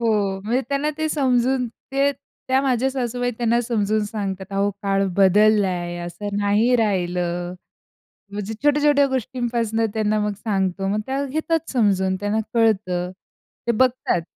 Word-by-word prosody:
हो, 205 -4 +1
म्हणजे 240 +5 +1
त्यांना 285 +2 0
ते 315 0 0
समजून, 255 -3 +1
ते 275 +4 -1 0.4
त्या 260 +1 +3
माझ्या 260 0 +1
सासूबाई 245 -1 -2
त्यांना 235 0 +2
समजून 215 -2 0
सांगतात, 200 -3 -4
अहो 200 +1 +1
काळ 195 0 +1
बदललाय 190 -3 +3
असं 205 +3 -5
नाही 210 +5 +3
राहिलं. 180 -4 -1 0.8
म्हणजे 210 +2 -4
छोट्या-छोट्या 290 -1 +4
गोष्टींपासून 235 -3 -1
त्यांना 215 -1 +1
मग 210 0 0
सांगतो 195 -2 -1
मग 210 +2 0
त्या 270 +1 -1
घेतात 315 +3 -1
समजून, 190 -6 +2
त्यांना 205 +2 0
कळतं. 190 -6 +1 0.6
ते 235 - +3
बघतात. 250 -7 +1
220 Hz, 135 wpm, -22 LUFS, 195-255 Hz, 0.8 s, छोट्या-छोट्या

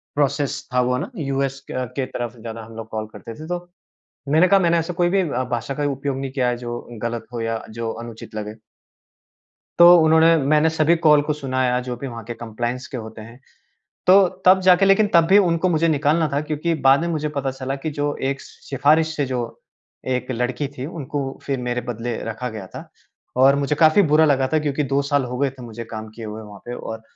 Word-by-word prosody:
Process 145 -1 0
था 125 - +3
वो 125 - +1
ना 145 - -4
यूएस 135 -2 -2
क - - -6
के - - -5
अ, 130 0 -1
के 135 -2 -1
तरफ 120 -2 -5
से 115 - -17
ज़्यादा 115 0 -7
हम 115 0 -13
लोग 115 0 -8
कॉल 110 -1 -4
करते 115 - -9
थे 155 - -8
तो। 175 0 -2 0.7
मैंने 170 +4 +6
कहा 195 0 +5
मैंने 170 -1 +3
ऐसा 165 +2 -2
कोई 175 - +4
भी 195 +1 +2
अ, 130 -7 -1
भाषा 120 +4 -4
का 145 - -1
उपयोग 135 0 -3
नहीं 135 -1 -4
किया 130 -2 0
है 120 - -2
जो 120 0 -5 0.2
गलत 115 -1 -3
हो 115 - -3
या 115 0 -2 0.2
जो 115 -1 -2
अनुचित 115 -1 -10
लगे। 105 0 -5 1.3
तो 175 +1 +10
उन्होंने 160 +1 +5
मैंने 150 +2 +3
सभी 160 +1 +3
कॉल 150 -1 +7
को 150 - -1
सुनाया 130 -3 0
जो 125 - -2
भी 135 +3 -6
वहाँ 115 -2 -7
के 120 - -5
कंप्लायंस 120 +2 -4
के 130 - -6
होते 110 -1 -8
हैं। 115 +4 -13 0.7
तो 190 0 +7 0.2
तब 190 +1 +7
जाके 185 +1 +5
लेकिन 195 +2 +4
तब 170 -1 +6
भी 195 +2 +6
उनको 180 -2 +2
मुझे 165 -1 +2
निकालना 155 +1 +2
था 145 - +1
क्योंकि 155 +2 -2
बाद 135 +2 +7
में 170 - -1
मुझे 155 -2 -1
पता 140 -2 -2
चला 135 +1 -4
कि 150 +3 -4
जो 145 0 0
एक 135 - -4
सिफ़ारिश 155 +4 0
से 145 - 0
जो 125 -2 -2 0.7
एक 130 0 -1
लड़की 125 +3 -2
थी, 135 -1 -7
उनको 145 -4 -5
फ़िर 135 -2 -2
मेरे 125 0 -2
बदले 120 0 -4
रखा 115 +3 -4
गया 105 -4 -8
था। - - -10 0.5
और 135 +2 +6
मुझे 140 +1 0
काफ़ी 160 +5 +5
बुरा 155 -2 +4
लगा 135 -3 +2
था 155 - +4
क्योंकि 150 0 -1
2 140 +1 +1
साल 140 -1 +1
हो 125 0 -5
गए 140 0 +1
थे 130 -2 -14
मुझे 115 0 -7
काम 110 -1 -7
किये 115 - -7
हुए 110 +1 -7
वहाँ 105 -2 -12
पे 120 - -5
और 110 -1 -7
135 Hz, 230 wpm, -21 LUFS, 120-155 Hz, 1.3 s, तो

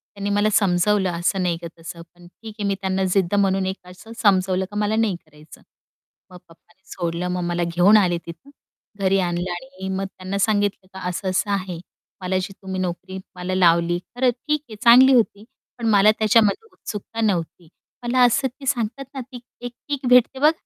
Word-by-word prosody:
त्यांनी 200 0 -3
मला 205 +1 +2
समजवलं 195 -1 +2
"असं 190 +2 0
नाही 170 -2 0
का 170 - -6
तसं" 165 +1 -9
पण 175 0 -16
ठीक 220 +4 -12
आहे 200 - -1
मी 195 - 0
त्यांना 190 0 -1
जिद्द 195 0 +1
म्हणून 195 -1 +2
एक 190 -1 -5
असं 185 +5 -14
समजवलं 190 -2 +2
का 205 - -10
"मला 210 +1 0
नाही 220 -4 +1
करायचं." 150 0 -17 0.7
मग 180 - -11
पप्पानी 175 +3 -23
सोडलं 170 +1 -3
मग 180 0 -2
मला 175 0 -1
घेऊन 200 +5 +6
आले 175 -4 +2
तिथून. 170 - -11 0.5
घरी 195 0 +2
आणलं 175 0 -2
आणि 180 +2 -7
मग 195 - -2
त्यांना 190 0 -6
सांगितलं, 205 -2 0
की 190 0 -13
"असं-असं 185 +3 -2
आहे. 185 -4 -3 0.4
मला 185 0 -1
जी 195 +1 -6
तुम्ही 190 -1 -5
नोकरी 185 +1 -5 0.2
मला 180 +1 -3
लावली, 170 -1 +3 0.2
खर 250 0 +3
ठीक 300 +5 -2
आहे 215 - -8
चांगली 255 +3 +8
होती. 220 -3 +1 0.3
पण 235 -2 -3
मला 210 0 +6
त्याच्यामध्ये 220 - +3
उत्सुकता 225 +2 -6
नव्हती." 175 -5 -2 0.3
मला 250 +1 +1
असं 255 +3 +2
ते 265 +3 -13
सांगतात 250 +1 -2
ना 265 - -5
ती 250 0 -10 0.2
एक 245 0 -5 0.2
किक 280 -3 -3
भेटते 250 +1 +4
बघ. 300 +3 +5
195 Hz, 185 wpm, -22 LUFS, 180-220 Hz, 0.7 s, चांगली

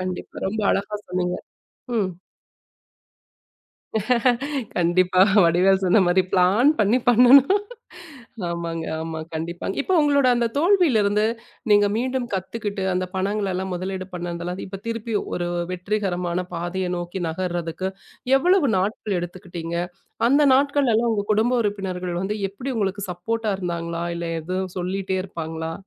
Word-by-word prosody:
கண்டிப்பா. 185 0 -5
ரொம்ப 215 +3 -2
அழகா 200 +2 -1
சொன்னீங்க. 180 0 -1 0.6
ம். 195 -4 +1 2.7
கண்டிப்பா. 180 +1 +3 0.2
வடிவேல் 185 +3 +4
சொன்ன 185 +4 +5
மாரி 180 +2 +4
"பளான் 195 +10 +4
பண்ணி 215 +4 +3
பண்ணணும்". 250 +4 +7 1.0
ஆமாங்க, 170 -1 -3 0.2
ஆமா. 160 0 -5 0.2
கண்டிப்பா. 170 +2 -4 0.2
இப்போ 375 - -2
உங்களோட 285 -3 +3
அந்தத் 235 0 -1
தோல்வில 340 - +4
இருந்து 210 +1 +2 0.5
நீங்க 205 0 +6
மீண்டும் 255 +1 -1
கத்துக்குட்டு 200 +1 -3
அந்தப் 185 +1 -3
பணங்களலா 190 -1 -1
முதலீடு 185 +1 -4
பண்ணதுலா. 175 0 -4
இப்ப 190 0 -8
திருப்பி 230 -1 -3 0.2
ஒரு 175 -1 -2 0.2
வெற்றிகரமான 180 -2 -2
பாதைய 175 +2 -2
நோக்கி 175 +2 -5
நகர்றதுக்கு 175 +1 -3 0.5
எவ்ளோ 360 +8 +4 0.2
நாட்கள் 200 +1 -1
எடுத்துக்கிட்டீங்க, 175 -1 -6 0.5
அந்த 280 +4 +4
நாட்கள்லலா 265 -4 +2
உங்க 210 -2 0
குடும்ப 220 +4 +2
உறுப்பினர்கள் 185 -4 -3
வந்து 200 +2 -2
எப்டி 240 +8 -6
உங்களுக்கு 200 -1 -1
சப்போர்ட்டா 215 +5 -2
இருந்தாங்களா, 170 -2 -3
இல்ல 170 0 -4
எதுவு 185 +4 -2
சொல்லிட்டே 190 +1 -2
இருப்பாங்களா? 160 -2 -5
190 Hz, 120 wpm, -23 LUFS, 175-220 Hz, 2.7 s, பண்ணணும்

